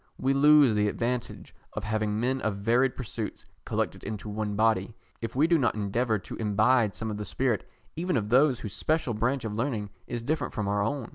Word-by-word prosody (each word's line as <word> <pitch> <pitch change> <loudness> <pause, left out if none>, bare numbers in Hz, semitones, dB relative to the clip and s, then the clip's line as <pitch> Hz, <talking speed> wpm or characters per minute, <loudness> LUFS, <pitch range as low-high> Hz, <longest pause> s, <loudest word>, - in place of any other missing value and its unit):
We 135 +1 +1
lose 145 -3 +6
the 105 0 +2
advantage 120 +2 -3 0.2
of 105 - -4
having 110 -1 -1
men 130 +3 0
of 110 -2 -1
varied 120 +6 +2
pursuits 115 -3 -5 0.2
collected - - -2
into 105 0 -5
one 105 0 -3
body, 110 -1 +1 0.3
if 115 0 -5
we 145 +4 +4
do 170 -1 +3
not 120 -6 +1
endeavour 110 +2 0
to 95 - -8
imbibe 110 +1 +2
some 110 -1 -4
of 105 - -4
the 105 - -4
spirit 115 +3 -1 0.3
even 180 +2 0
of 105 -2 -2
those 130 +1 +4
whose 105 -4 -5
special 155 -6 0
branch 120 +3 0
of 110 - -3
learning 110 -3 -2 0.2
is 120 -1 -4
different 145 0 -2
from 105 -2 -1
our 100 0 +1
own. 115 +3 -2
115 Hz, 205 wpm, -28 LUFS, 105-130 Hz, 0.3 s, lose